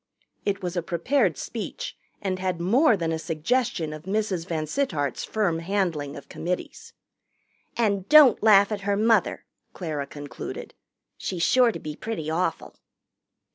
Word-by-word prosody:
It 200 Hz, -1 st, -1 dB
was 180 Hz, 0 st, -3 dB
a 175 Hz, -, +1 dB
prepared 175 Hz, -, +1 dB
speech -, -, -5 dB, 0.3 s
and 185 Hz, -2 st, -1 dB
had 185 Hz, -2 st, -2 dB
more 225 Hz, -, +4 dB
than 165 Hz, -2 st, -1 dB
a 160 Hz, -, -1 dB
suggestion 165 Hz, +1 st, -1 dB
of 155 Hz, +1 st, -9 dB
Mrs. 190 Hz, -4 st, -1 dB
VanSittart's 155 Hz, -, -1 dB
firm 195 Hz, -7 st, 0 dB
handling 165 Hz, -6 st, -1 dB
of 140 Hz, -, -10 dB
committees. 180 Hz, +2 st, -5 dB, 0.8 s
"And 200 Hz, -5 st, 0 dB
don't 300 Hz, -6 st, +8 dB
laugh 205 Hz, -1 st, +6 dB
at 205 Hz, -2 st, -2 dB
her 200 Hz, 0 st, 0 dB
mother," 220 Hz, -2 st, +2 dB, 0.3 s
Clara 150 Hz, -6 st, -4 dB
concluded. 145 Hz, -1 st, -7 dB, 0.4 s
"She's 175 Hz, -3 st, -3 dB
sure 250 Hz, +2 st, +5 dB
to -, -, -6 dB
be 150 Hz, -1 st, -7 dB
pretty 165 Hz, -6 st, -4 dB
awful." 165 Hz, 0 st, -2 dB
185 Hz, 140 wpm, -25 LUFS, 160-215 Hz, 0.8 s, don't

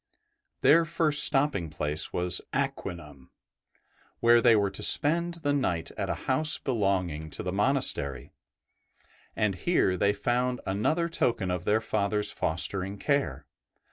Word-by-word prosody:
Their 165 Hz, +3 st, +5 dB
first 155 Hz, -2 st, +3 dB
stopping 135 Hz, -, +1 dB
place 75 Hz, 0 st, -4 dB
was 90 Hz, 0 st, -1 dB
Aquinum, 85 Hz, -, -5 dB, 0.9 s
where 120 Hz, 0 st, +4 dB
they 115 Hz, -1 st, +5 dB
were 100 Hz, -2 st, +1 dB
to 95 Hz, -, -7 dB
spend 170 Hz, +3 st, +4 dB
the 145 Hz, -4 st, -2 dB
night 90 Hz, -13 st, -2 dB
at -, -, -5 dB
a -, -, -1 dB
house 150 Hz, +4 st, +4 dB
belonging 95 Hz, -, -2 dB
to -, -, -8 dB
the 90 Hz, -, -3 dB
monastery, 95 Hz, -, -1 dB, 1.0 s
and 105 Hz, -3 st, 0 dB
here 95 Hz, -, 0 dB
they 100 Hz, +3 st, +1 dB
found 125 Hz, +4 st, -1 dB
another 150 Hz, -, -1 dB
token 120 Hz, -, -1 dB
of 90 Hz, 0 st, -4 dB
their 110 Hz, +2 st, +1 dB
Father's 105 Hz, -1 st, -1 dB
fostering 95 Hz, +4 st, -3 dB
care. 95 Hz, -, -2 dB
105 Hz, 135 wpm, -27 LUFS, 90-140 Hz, 1.0 s, Their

